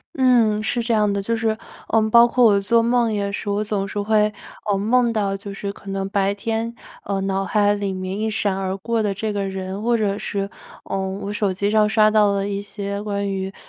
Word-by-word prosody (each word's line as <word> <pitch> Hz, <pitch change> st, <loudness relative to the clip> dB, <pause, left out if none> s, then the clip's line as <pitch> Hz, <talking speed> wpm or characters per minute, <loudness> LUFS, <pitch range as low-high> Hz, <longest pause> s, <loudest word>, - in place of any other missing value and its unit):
嗯， 235 Hz, -5 st, +3 dB
是 235 Hz, +2 st, 0 dB
这 235 Hz, -, -2 dB
样 210 Hz, -2 st, +3 dB
的， 200 Hz, 0 st, -1 dB
就 230 Hz, +4 st, -1 dB
是， 225 Hz, 0 st, 0 dB, 0.4 s
呃， 225 Hz, 0 st, +3 dB
包 235 Hz, +1 st, +7 dB
括 245 Hz, +1 st, +2 dB
我 205 Hz, -3 st, +6 dB
做 230 Hz, +3 st, +3 dB
梦 235 Hz, -1 st, +2 dB
也 200 Hz, -1 st, -1 dB
是， 205 Hz, -, -5 dB
我 205 Hz, +1 st, 0 dB
总 200 Hz, -2 st, -2 dB
是 205 Hz, -, -3 dB
会， 210 Hz, 0 st, +2 dB, 0.4 s
呃， 200 Hz, -, +3 dB
梦 235 Hz, +4 st, +2 dB
到 200 Hz, -3 st, 0 dB
就 200 Hz, 0 st, -8 dB
是 200 Hz, 0 st, -4 dB
可 195 Hz, -1 st, -10 dB
能 195 Hz, 0 st, -3 dB
白 200 Hz, -1 st, +1 dB
天， 225 Hz, +3 st, -3 dB, 0.3 s
呃， 195 Hz, -1 st, -2 dB
脑 195 Hz, 0 st, -1 dB
海 205 Hz, -1 st, +2 dB
里 200 Hz, -2 st, -2 dB
面 185 Hz, +1 st, -4 dB
一 220 Hz, -, 0 dB
闪 205 Hz, -2 st, 0 dB
而 190 Hz, 0 st, -2 dB
过 225 Hz, +2 st, -1 dB
的 205 Hz, -, 0 dB
这 210 Hz, +2 st, -3 dB
个 200 Hz, -1 st, -2 dB
人。 190 Hz, -1 st, -5 dB
或 235 Hz, 0 st, +2 dB
者 205 Hz, -2 st, 0 dB
是， 200 Hz, -1 st, -3 dB, 0.4 s
呃， 195 Hz, -, -3 dB
我 190 Hz, +1 st, -4 dB
手 205 Hz, -2 st, 0 dB
机 200 Hz, +2 st, -1 dB
上 215 Hz, 0 st, +4 dB
刷 215 Hz, -1 st, +4 dB
到 210 Hz, -1 st, +4 dB
了 200 Hz, 0 st, -1 dB
一 200 Hz, 0 st, -2 dB
些 200 Hz, 0 st, -5 dB
关 200 Hz, -1 st, -2 dB
于 190 Hz, 0 st, -3 dB
205 Hz, 245 characters per minute, -21 LUFS, 195-220 Hz, 0.4 s, 包